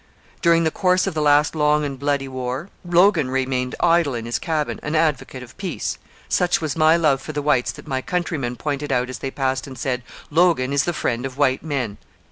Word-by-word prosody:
During 170 Hz, -1 st, +4 dB
the 160 Hz, -, +1 dB
course 185 Hz, +1 st, +2 dB
of 195 Hz, -, -2 dB
the 155 Hz, -, -1 dB
last 145 Hz, 0 st, +4 dB
long 150 Hz, -1 st, +2 dB
and 135 Hz, -2 st, -5 dB
bloody 140 Hz, -1 st, 0 dB
war, 130 Hz, +6 st, -4 dB
Logan 175 Hz, -4 st, +3 dB
remained 130 Hz, -1 st, -1 dB
idle 165 Hz, -6 st, +3 dB
in 115 Hz, -1 st, -4 dB
his 120 Hz, -, -2 dB
cabin, 155 Hz, -3 st, -2 dB
an 150 Hz, +2 st, -3 dB
advocate 150 Hz, -5 st, 0 dB
of 125 Hz, -, -14 dB
peace. 195 Hz, -2 st, -4 dB, 0.3 s
Such 175 Hz, -1 st, +2 dB
was 155 Hz, -4 st, -3 dB
my 160 Hz, +1 st, +5 dB
love 150 Hz, -5 st, +2 dB
for 155 Hz, -, -7 dB
the 145 Hz, -, -2 dB
whites 140 Hz, -4 st, +2 dB
that -, -, -12 dB
my 130 Hz, -3 st, -2 dB
countrymen 155 Hz, -7 st, -2 dB
pointed 145 Hz, +1 st, -3 dB
as 125 Hz, -1 st, -1 dB
they 135 Hz, -, -3 dB
passed 130 Hz, 0 st, -2 dB
and 130 Hz, -2 st, -9 dB
said, 125 Hz, 0 st, -2 dB, 0.3 s
'Logan 160 Hz, -5 st, +3 dB
is 140 Hz, -1 st, +2 dB
the 175 Hz, -, -1 dB
friend 120 Hz, -5 st, -1 dB
of 135 Hz, 0 st, -5 dB
white 135 Hz, -2 st, +2 dB
men. 130 Hz, -9 st, -3 dB
145 Hz, 210 wpm, -22 LUFS, 130-160 Hz, 0.3 s, my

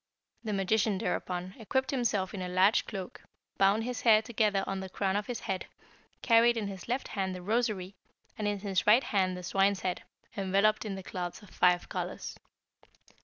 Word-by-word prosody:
The 220 Hz, -, -3 dB
magician, 200 Hz, +1 st, +1 dB
thereupon, 180 Hz, 0 st, -3 dB
equipped 265 Hz, +4 st, -1 dB
himself 225 Hz, -8 st, 0 dB
in 195 Hz, -, -5 dB
a 180 Hz, -, -3 dB
large 185 Hz, +4 st, +3 dB
cloak, 190 Hz, -4 st, -7 dB, 0.4 s
bound 200 Hz, +3 st, +4 dB
his 250 Hz, 0 st, -4 dB
hair 220 Hz, -2 st, +5 dB
together 210 Hz, -4 st, +1 dB
on 195 Hz, 0 st, -3 dB
the 190 Hz, 0 st, -6 dB
crown 190 Hz, 0 st, -1 dB
of 205 Hz, 0 st, -1 dB
his 245 Hz, -, -4 dB
head, 190 Hz, -1 st, -3 dB, 0.6 s
carried 235 Hz, 0 st, +5 dB
in 220 Hz, -, -1 dB
his 190 Hz, -2 st, -8 dB
left 250 Hz, +3 st, -2 dB
hand 190 Hz, -2 st, -2 dB
the 180 Hz, -, -7 dB
rosary, 210 Hz, -3 st, -1 dB, 0.4 s
and 215 Hz, -2 st, -2 dB
in 205 Hz, 0 st, 0 dB
his 195 Hz, -2 st, -1 dB
right 230 Hz, +6 st, +6 dB
the 185 Hz, -2 st, +1 dB
swine's 195 Hz, +2 st, +2 dB
head, 180 Hz, -1 st, -2 dB, 0.3 s
enveloped 200 Hz, +2 st, +2 dB
in 200 Hz, -2 st, -3 dB
the 190 Hz, -, -7 dB
cloths 180 Hz, +2 st, -5 dB
of 205 Hz, -, -16 dB
five 180 Hz, 0 st, +3 dB
colours. -, -, -5 dB
200 Hz, 180 wpm, -30 LUFS, 185-220 Hz, 0.6 s, right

